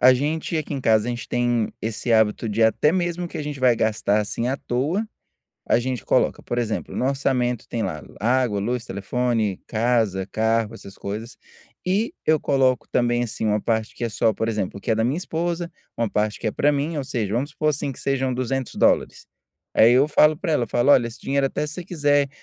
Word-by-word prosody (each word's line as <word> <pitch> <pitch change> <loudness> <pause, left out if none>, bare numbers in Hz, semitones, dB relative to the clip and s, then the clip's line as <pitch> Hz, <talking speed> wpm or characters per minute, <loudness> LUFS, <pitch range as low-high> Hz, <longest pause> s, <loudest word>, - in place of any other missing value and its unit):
a 130 +1 +8
gente 155 +5 -1
aqui 155 -1 -3
em 135 - -3
casa, 110 -2 +3
a - - -1
gente 120 -1 -5
tem 120 -2 0
esse 115 +2 -2
hábito 110 +1 +2
de 110 +2 +1
até 110 +7 +4
mesmo 175 -1 -1
que - - -7
a - - -3
gente 145 -2 -5
vai 125 -2 +4
gastar 105 -1 +1
assim 115 +3 -2
à 135 - 0
toa, 150 - -1 0.6
a - - +4
gente 125 0 -3
coloca - - +1
por 120 - -3
exemplo 110 -3 -2
no - - -1
orçamento. 125 -3 0
Tem 115 - -2
lá 75 -6 -3 0.2
água, 120 -2 +1
luz, 120 +3 -2
telefone, 110 -1 -1
casa, 110 -5 +1
carro, 115 0 +1
essas 100 -3 -11
coisas, 110 +5 -6 0.5
e 205 - 0
eu 155 0 +4
coloco 130 -3 +1
também, 120 0 +1
assim, 110 -1 -3
uma 105 0 +2
parte 110 -1 -1
que - - -3
é 115 - 0
só 110 +1 +1
por 110 +2 -2
exemplo 105 -3 -2
o - - -13
que - - -3
é - - +4
da 110 +1 +1
minha 135 +8 0
esposa, 170 0 -3 0.3
uma 115 -2 0
parte 105 +1 -1
que 115 - -5
é 110 - 0
pra 145 - +2
mim 145 +3 -1
ou 140 - -2
seja 110 -5 -2
vamos 135 +5 -1
supor, 155 +1 0
assim, 140 -1 -2
que - - -13
sejam 135 -1 0
$200 130 0 0 0.5
aí 115 +2 +6
eu 135 +4 +5
falo 150 0 +4
pra 165 -2 -2
ela, 120 -5 +1
falo: 120 +5 +2
"Olha, 120 - +5
esse 115 - -12
dinheiro, 140 0 +1
até 150 - -2
se 150 - -7
você 180 - -6
quiser 145 -4 +2
120 Hz, 220 wpm, -23 LUFS, 110-145 Hz, 0.6 s, a